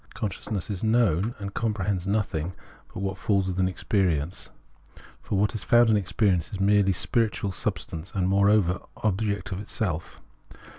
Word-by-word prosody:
Consciousness 100 -2 -3
knows 110 -6 +3
and 100 -1 -6
compre 105 -4 -1
hends 95 -3 -1
nothing 95 -5 -1 0.4
but - - -6
what 95 0 -3
falls 100 -3 +1
within 95 0 +1
its 95 - -4
experience; 90 -5 0 0.7
for 100 - -2
what 105 +2 +2
is 110 - -2
found 120 -1 +5
in - - +5
experience 95 -3 +1
is 100 - -5
merely 100 0 +4
spiritual 105 0 0
sub - - -1
stance, 80 +3 -7
and, 95 -2 +1
moreover, 100 -1 +3 0.2
object 105 -1 0
of 95 - -3
its 105 - -7
self. 85 -6 -2
100 Hz, 160 wpm, -26 LUFS, 90-105 Hz, 0.7 s, found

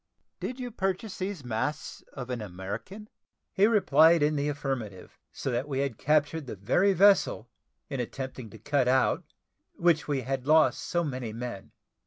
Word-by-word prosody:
"Did 255 +1 -5
you 245 -1 -5
purchase 195 0 -3
these 185 -7 -4
masts 130 +6 -3
of 125 -2 -6
an 120 -2 -3
American?" 105 - -7 0.5
He 200 +2 +4
replied 165 -7 +5
in 150 +1 +2
the 145 0 0
affirmative; 135 -9 -5
so 135 - -4
that 125 +4 -1
we 135 -2 -1
had 140 -5 -3
captured 150 0 +1
the - - -5
very 130 - +2
vessel, 190 - +3 0.4
in 135 -3 -4
attempting 130 -1 -5
to - - -12
cut 145 -3 0
out 130 +1 +2 0.5
which 170 -3 +2
we 140 -3 0
had 135 0 -3
lost 155 +1 +4
so 175 -1 -1
many 130 -7 -4
men. 115 -4 -7
140 Hz, 165 wpm, -28 LUFS, 125-170 Hz, 0.5 s, replied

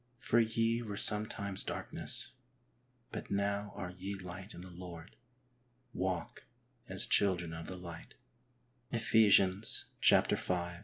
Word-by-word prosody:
For 120 -2 +2
ye 115 +1 +1
were 105 -3 -5
sometimes 105 -2 0
darkness, - - +1 0.8
but - - -6
now 100 +1 -1
are 90 -2 -5
ye 95 +2 -5
light 95 +2 -8
in - - -9
the 90 0 -10
Lord; 90 0 -10 0.8
walk 90 -2 -3 0.4
as - - +1
children 90 -4 +1
of 80 0 -7
the 95 - -6
light 85 -2 -10 0.4
" 120 0 -39
{Ephesians 105 -3 +4 0.2
v. - - +6
100 Hz, 120 wpm, -34 LUFS, 90-110 Hz, 0.8 s, v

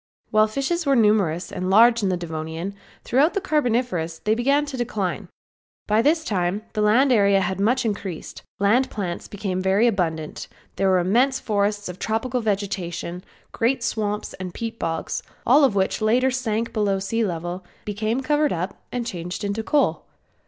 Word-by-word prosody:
While 215 0 +5
fishes 275 +10 -1
were 275 - +4
numerous 205 -7 +2
and 185 0 -3
large 230 +4 +6
in 200 - +1
the 180 - 0
Devonian, 165 +2 -5 0.3
throughout 290 - +2
the - - +2
Carboniferous 245 - 0
they 215 - 0
began 275 +6 +2
to 285 -2 -6
decline. 210 -7 -3 0.6
By 215 +1 +3
this 315 +5 +2
time 195 - -1
the 215 - -1
land 240 +6 +4
area 200 -4 +4
had 190 0 -2
much 245 +5 +2
increased, 200 -6 -4 0.2
land 225 +6 +3
plants 180 -5 -4
became 190 -2 -3
very 190 +4 +3
abundant, 165 -8 -1 0.3
there 195 0 +2
were 185 - +4
immense 235 +10 +2
forests 205 -1 -1
of 180 0 -7
tropical 240 +3 -1
vegetation, 185 -4 -3 0.3
great 240 +1 0
swamps 210 -2 -2
and 185 -2 -6
peat 230 0 -5
bogs 165 0 -2 0.2
all 280 +5 +6
of 260 -7 +3
which 190 +2 0
later 245 +5 +3
sank 230 -3 -2
below 205 -3 +1
sea 225 +4 -1
level 175 -1 -3 0.2
became 215 +4 -1
covered 295 +2 +1
up 180 +3 -4
and 245 -1 -3
changed 180 -2 -5
into 200 +2 -1
coal. 290 +6 +1
210 Hz, 165 wpm, -23 LUFS, 185-240 Hz, 0.6 s, large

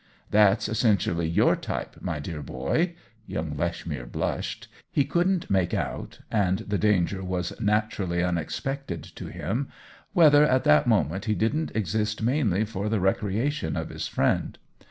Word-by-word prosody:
"That's 105 0 +4
essentially 100 -7 +1
your 85 - +4
type, - - -5
my 85 -4 -2
dear 75 +1 -5
boy." 160 - -1 0.3
Young 80 -1 -3
Lechmere 75 -5 -3
blushed; - - -3 0.2
he 140 - +2
couldn't 175 +4 +1
make 95 -3 +2
out - - -4
(and 95 -3 +2
the 105 -1 -3
danger 95 -2 +2
was 90 -1 -2
naturally 105 -4 0
un 90 -1 +1
expected 135 - -4
to - - -9
him) 125 +8 -3 0.5
whether 150 -3 +7
at 130 -3 +3
that 75 0 +5
moment 95 +8 +1
he 110 -2 +1
didn't 150 +10 0
exist 105 +1 -1
mainly 110 - +2
for 105 -1 -3
the 110 -1 +1
recreation 100 - 0
of - - -3
his - - -4
friend. - - 0
105 Hz, 150 wpm, -26 LUFS, 85-115 Hz, 0.5 s, whether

